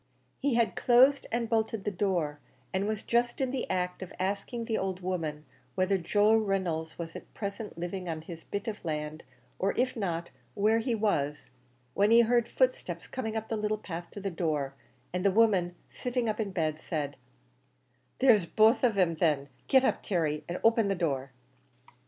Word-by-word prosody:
He 280 -3 +1
had 225 -6 +2
closed 260 +3 +5
and 235 0 0
bolted 220 -2 0
the 210 - -1
door, 175 -7 -1 0.3
and 190 +2 0
was 215 -1 -2
just 240 0 +1
in 260 -2 0
the 260 -2 -3
act 180 -1 -1
of 185 - -7
asking 200 +5 -2
the 225 -1 0
old 190 -1 -3
woman 160 -5 -3 0.3
whether 190 0 +2
Joe 205 +5 +3
Reynolds 185 -7 -1
was 165 -1 -6
at - - -10
present 200 -1 -5
living 175 +1 -4
on 160 -1 -4
his 165 -1 -9
bit 200 +1 -4
of 220 -1 -4
land, 155 -1 -3 0.4
or 195 +1 +1
if 255 +1 +1
not, 170 -6 -3 0.2
where 215 +2 +3
he 235 0 0
was, 150 -12 -1 0.4
when 200 +1 +3
he 230 +1 +8
heard 235 0 +2
footsteps - - 0
coming 220 -4 -4
up 220 0 -5
to 225 - 0
the 215 - -3
little 215 0 0
path 175 -4 -7
to - - -8
the 195 -1 -3
door, 155 -5 -1 0.4
and 180 0 -1
the 200 - +5
woman, 190 -4 +3 0.2
sitting 245 -1 -2
up 215 0 -1
in 215 -2 -1
bed, 155 -4 -1
said, 145 -3 -3 1.0
"There's 220 -9 +5
both 220 +6 +4
on 230 -5 +3
'em 175 -3 +3
thin; 150 -4 +1 0.2
get 265 -1 +5
up, - - +1
Terry, 155 -5 -1
and 175 - -3
open 225 -1 +4
the 195 - +1
door." 140 -6 -1
195 Hz, 190 wpm, -30 LUFS, 170-225 Hz, 1.0 s, he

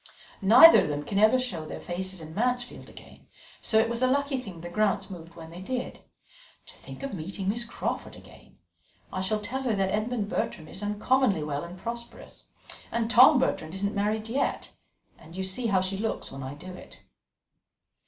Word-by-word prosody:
Neither 230 +12 +9
of - - -1
them 145 -1 -3
can 200 +4 -1
ever 215 +4 +6
show 215 -11 -3
their 155 - -7
faces 185 0 -4
in 160 0 -9
Mansfield 245 +4 -2
again, - - -15 0.3
so 220 - +1
it 220 +1 +4
was 235 +1 -2
a 255 - +4
lucky 280 0 +1
thing 190 -9 -9
the 175 - -6
Grants 200 0 0
moved 170 -2 -10
when 165 -1 -10
they 175 +2 -9
did. 250 +5 -4 0.7
To - - -14
think - - -11
of 275 - -4
meeting 190 +2 -5
Miss 230 +4 +1
Crawford 230 - -4
again! - - -17 0.6
I 185 - -2
shall 215 +3 0
tell 240 +6 -3
her 245 -5 0
that 190 -1 0
Edmund 215 0 -1
Bertram 160 -6 -3
is 190 - -9
uncommonly 210 - +1
well 145 0 -3
and 175 +2 -9
prosperous, 235 +4 -8 0.5
and 230 0 -1
Tom 255 +4 +8
Bertram 165 -10 -1
isn't 200 +1 -2
married 215 +2 -1
yet; 255 +5 -1 0.5
and 165 +2 -13
you 190 - -2
see 190 +6 -1
how 195 -3 +3
she 190 +1 -3
looks 225 +1 -3
when 135 - -7
I 135 +2 -6
do 180 +5 -10
it." - - -13
205 Hz, 195 wpm, -27 LUFS, 180-235 Hz, 0.7 s, Neither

